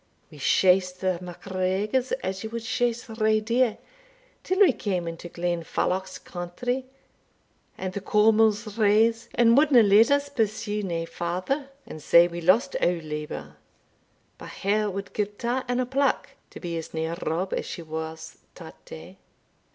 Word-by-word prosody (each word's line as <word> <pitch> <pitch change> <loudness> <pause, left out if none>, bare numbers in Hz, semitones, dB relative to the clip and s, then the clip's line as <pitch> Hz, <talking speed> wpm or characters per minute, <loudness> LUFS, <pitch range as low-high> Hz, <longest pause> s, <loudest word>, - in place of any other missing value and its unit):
We 150 - -13
shased 180 +5 +3
the 185 -2 0
MacGregors 190 +7 -2
as 190 +2 -3
ye 220 - -4
wad 230 0 -5
shase 240 0 -1
rae 220 -1 +1
deer, 230 +1 +1 0.7
till 375 +1 -1
we 355 -10 +7
came 185 -7 -2
into 165 +1 -7
Glenfalloch's 175 +2 -2
country, 245 +9 -4 0.9
and 185 -1 -4
the 200 - -4
Cawmils 215 +1 +2
raise, 225 +2 +3
and 230 -1 +5
wadna 280 -4 +6
let 210 +3 +6
us 285 0 +2
pursue 215 -5 -1
nae 170 -4 -3
farder, 185 - -3 0.2
and 155 - -9
sae 170 +3 +6
we 170 0 -6
lost 195 +11 +3
our 175 -1 +2
labour; 150 -1 -6 0.8
but - - -9
her 210 +2 +1
wad 200 +1 -6
gie 210 - +1
twa 235 +5 -3
and 245 0 0
a 255 - +1
plack 275 +3 0 0.2
to - - -11
be 170 -2 -4
as 160 - -9
near 160 +1 -2
Rob 180 +4 -2
as - - -2
she 170 - -6
was 160 0 -7 0.2
tat - - -12
day." 85 +4 -11
200 Hz, 155 wpm, -26 LUFS, 175-230 Hz, 0.9 s, we